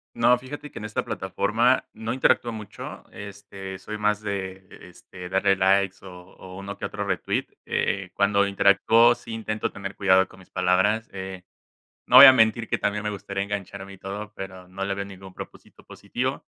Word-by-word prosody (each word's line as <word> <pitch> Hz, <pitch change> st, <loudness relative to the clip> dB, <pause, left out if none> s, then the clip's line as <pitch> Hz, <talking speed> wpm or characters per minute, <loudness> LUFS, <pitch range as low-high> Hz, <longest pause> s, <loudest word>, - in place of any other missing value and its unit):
No, 125 Hz, 0 st, +4 dB
fíjate 145 Hz, +4 st, -9 dB
que -, -, -8 dB
en -, -, -9 dB
esta 105 Hz, -, -3 dB
plataforma 120 Hz, +4 st, +1 dB
no 110 Hz, +1 st, -5 dB
interactúo 120 Hz, -2 st, +2 dB
mucho, 110 Hz, -3 st, -9 dB
este, 100 Hz, -1 st, -9 dB
soy 105 Hz, -, -6 dB
más 105 Hz, 0 st, +1 dB
de, 95 Hz, -2 st, -5 dB, 0.2 s
este, 90 Hz, -1 st, -11 dB
darle 95 Hz, +1 st, +2 dB
likes 95 Hz, 0 st, +2 dB
o 95 Hz, -, -9 dB, 0.3 s
o 95 Hz, 0 st, -11 dB
uno 100 Hz, +1 st, -7 dB
que -, -, -13 dB
otro -, -, -3 dB
retweet. -, -, -1 dB, 0.2 s
Eh, -, -, -1 dB
cuando 100 Hz, 0 st, +2 dB
interactúo, 100 Hz, +4 st, +4 dB
sí 115 Hz, -, -11 dB
intento 110 Hz, -1 st, -3 dB
tener 100 Hz, 0 st, -7 dB
cuidado 95 Hz, -1 st, +4 dB
con 95 Hz, -, -17 dB
mis 95 Hz, -, -18 dB
palabras. 95 Hz, +5 st, +1 dB
Eh, 95 Hz, -1 st, -7 dB, 0.7 s
no 125 Hz, -, +4 dB
voy 135 Hz, +2 st, +13 dB
a 130 Hz, -, +10 dB
mentir 110 Hz, -1 st, +3 dB
que -, -, -1 dB
también 105 Hz, +1 st, -1 dB
me 105 Hz, -, -2 dB
gustaría 100 Hz, 0 st, -4 dB
engancharme 100 Hz, -1 st, -6 dB
y -, -, -13 dB
todo, 105 Hz, +2 st, -7 dB
pero 95 Hz, -1 st, -8 dB
no 95 Hz, +1 st, -6 dB
le 100 Hz, 0 st, -2 dB
veo 100 Hz, 0 st, -4 dB
ningún 95 Hz, -1 st, -12 dB
propósito -, -, -12 dB
positivo, -, -, -4 dB
100 Hz, 185 wpm, -25 LUFS, 95-105 Hz, 0.7 s, voy